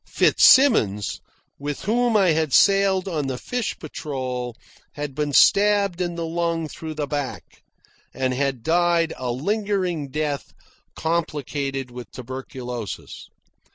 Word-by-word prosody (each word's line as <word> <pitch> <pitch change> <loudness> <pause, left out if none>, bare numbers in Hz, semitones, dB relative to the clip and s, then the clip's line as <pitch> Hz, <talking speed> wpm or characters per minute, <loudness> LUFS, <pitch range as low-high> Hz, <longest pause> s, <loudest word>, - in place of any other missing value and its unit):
Fitzsimmons, 110 - +4 0.4
with 145 0 -4
whom 235 +2 +2
I 190 -3 +4
had 155 -3 +1
sailed 195 -1 +4
on 155 -6 -2
the 130 -2 -3
Fish 245 - -3
Patrol, 130 -6 -5 0.4
had 145 -2 -5
been 150 +1 -2
stabbed 200 +3 +4
in 175 -1 -2
the 170 -1 -3
lung 165 -1 -1
through 155 +1 -7
the 150 -1 -2
back 145 -2 -5 0.5
and 130 -1 -1
had 135 -2 -1
died 170 0 +2
a 125 -1 -4
lingering 185 - -1
death 145 -1 -3 0.4
complicated 145 -5 -2
with 120 -3 -9
tuberculosis. 125 -3 -7
155 Hz, 120 wpm, -23 LUFS, 130-180 Hz, 0.5 s, Fitzsimmons